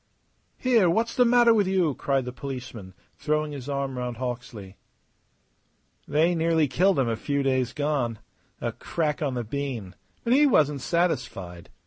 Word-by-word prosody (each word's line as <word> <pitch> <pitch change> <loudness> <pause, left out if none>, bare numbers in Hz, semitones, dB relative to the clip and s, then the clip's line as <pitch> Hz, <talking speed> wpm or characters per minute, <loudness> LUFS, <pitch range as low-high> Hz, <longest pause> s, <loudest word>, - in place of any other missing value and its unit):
"Here, 235 -8 +3
what's 225 +7 0
the 250 -2 +4
matter 240 -1 +5
with 205 -4 +2
you?" 185 -6 +2
cried 135 -1 -1
the 125 - -6
policeman, 125 -8 -7 0.2
throwing 150 0 0
his 140 -1 -7
arm 140 -2 -2
round 125 -1 -4
Hawksley. 120 -6 -6 1.3
"They 160 +4 +2
nearly 165 -2 +2
killed 185 +9 +2
him 135 -3 +2
a 115 - 0
few 140 +5 -1
days 130 -2 +1
gone. 145 -6 -1 0.4
A - - -2
crack 155 -3 -2
on 140 -4 -1
the 120 - -2
bean; 120 -6 -4 0.3
but 235 - +2
he 290 +3 +5
wasn't 150 - +2
satisfied. 95 - -2
140 Hz, 155 wpm, -26 LUFS, 125-170 Hz, 1.3 s, matter